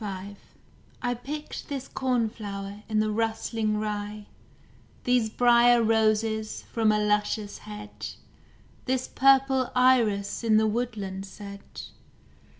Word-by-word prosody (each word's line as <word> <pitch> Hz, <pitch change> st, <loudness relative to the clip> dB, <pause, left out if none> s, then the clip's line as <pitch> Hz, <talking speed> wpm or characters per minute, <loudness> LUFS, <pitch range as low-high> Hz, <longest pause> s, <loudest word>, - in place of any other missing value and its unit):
V 200 Hz, 0 st, -6 dB, 0.7 s
I 245 Hz, 0 st, +1 dB
picked 290 Hz, +5 st, -7 dB
this 270 Hz, -2 st, -4 dB
cornflower 210 Hz, -5 st, -2 dB
in 215 Hz, -1 st, +1 dB
the 215 Hz, 0 st, +1 dB
rustling 220 Hz, 0 st, -1 dB
rye, 210 Hz, 0 st, -4 dB, 0.8 s
These 245 Hz, -3 st, +2 dB
briar 240 Hz, 0 st, +5 dB
roses 220 Hz, -1 st, +1 dB
from 220 Hz, -2 st, +3 dB
a 210 Hz, -, +2 dB
luscious 210 Hz, 0 st, 0 dB
hedge, 210 Hz, 0 st, -8 dB, 0.7 s
This 260 Hz, 0 st, 0 dB
purple 270 Hz, -1 st, +4 dB
iris 230 Hz, -6 st, +3 dB
in 220 Hz, -2 st, +4 dB
the 220 Hz, -, +4 dB
woodland 210 Hz, -4 st, -3 dB
sedge. 200 Hz, 0 st, -10 dB
220 Hz, 110 wpm, -27 LUFS, 210-245 Hz, 0.8 s, briar